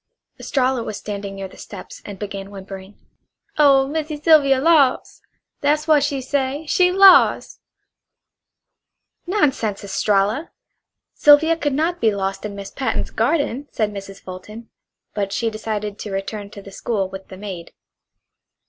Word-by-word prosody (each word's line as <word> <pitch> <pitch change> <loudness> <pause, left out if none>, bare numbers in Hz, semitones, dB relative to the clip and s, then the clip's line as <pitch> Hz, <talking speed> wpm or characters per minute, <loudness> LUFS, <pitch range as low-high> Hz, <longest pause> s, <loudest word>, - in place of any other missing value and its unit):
Estralla 260 -2 0
was 215 -2 -5
standing 200 -1 -6
near 195 -1 -6
the - - -17
steps - - -10
and 200 -2 -8
began 195 -1 -6
whimpering: 195 0 -10 0.6
"Oh, 275 -2 +5
Missy 305 0 -4
Sylvia 290 -4 +5
los'! 290 -3 +2 0.4
That 290 +1 +2
w'at 305 -1 +3
she 285 -2 -1
say. 275 +3 -2
She 360 +3 +3
lost!" 385 -1 +5 1.7
"Nonsense, 270 - 0
Estralla! 205 +7 0 0.6
Sylvia 300 +3 +5
could 290 -3 -2
not 330 +5 -1
be 225 - +4
lost 195 +1 -3
in 205 -1 -6
Miss 200 -1 -8
Patten's 270 - -3
garden," 285 -3 0
said 210 -2 -1
Mrs. 195 -1 -9
Fulton; 210 +5 -10 0.4
but 200 -2 -2
she 225 +2 -1
decided 215 -1 -4
to 210 - -6
return 200 +1 -5
to 200 -1 -11
the 195 - -12
school 200 -1 -2
with 190 0 -10
the 185 - -11
maid. 190 -4 -8
220 Hz, 140 wpm, -20 LUFS, 200-290 Hz, 1.7 s, Oh